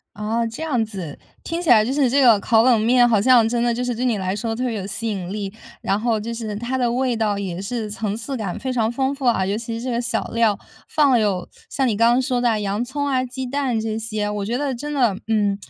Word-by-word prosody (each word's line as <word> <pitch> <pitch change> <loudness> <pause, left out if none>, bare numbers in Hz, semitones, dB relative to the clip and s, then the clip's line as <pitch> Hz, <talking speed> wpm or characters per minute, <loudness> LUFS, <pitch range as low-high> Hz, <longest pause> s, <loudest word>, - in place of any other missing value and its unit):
哦， 220 +3 -1
这 230 - -7
样 260 -8 0
子， 185 -9 -7 0.3
听 335 +1 -3
起 315 - 0
来 215 -3 +7
就 255 - -2
是 275 -4 +2
这 280 +2 +3
个 235 -5 +6
烤 225 +1 +4
冷 240 -3 +4
面 240 +2 +4
好 220 -4 +3
像 235 -1 +5
真 235 0 0
的 240 0 +2
就 245 +2 -2
是 245 -1 -1
对 250 +3 -3
你 230 -5 +1
来 185 0 -2
说 225 +2 -3
特 250 +3 -3
别 235 -3 -1
有 195 -2 -4
吸 215 +3 -5
引 190 -3 -4
力， 200 -2 -4 0.3
然 195 - 0
后 230 -2 +1
就 230 +2 -5
是 220 -3 -5
它 240 +4 -3
的 245 -2 +1
味 250 -1 0
道 210 -2 0
也 190 -2 -4
是 225 0 -3
层 210 -1 -3
次 260 +4 -5
感 200 -6 -4
非 260 -1 -3
常 225 -2 +1
丰 265 +3 -1
富 275 -1 -8
啊， 190 -6 +2
尤 200 +2 -1
其 230 0 -5
是 240 - -7
这 255 - -2
个 235 - 0
小 235 -2 -2
料， 225 -3 +2 0.3
放 290 -3 +3
了 240 - +4
有 195 -4 -1 0.2
像 270 -2 0
你 215 -4 0
刚 230 +2 +4
刚 250 - +3
说 250 -2 0
的 225 -3 +1
洋 205 +3 -1
葱 285 +3 -3
啊， 260 -2 +1
鸡 255 +1 -5
蛋 260 -3 -1
这 220 0 -3
些， 215 -2 -3
我 210 -1 -3
觉 235 +5 -2
得 280 -3 -1
真 295 +5 -5
的， 240 -9 +2
嗯， 205 -3 +2
230 Hz, 295 characters per minute, -21 LUFS, 210-250 Hz, 0.3 s, 来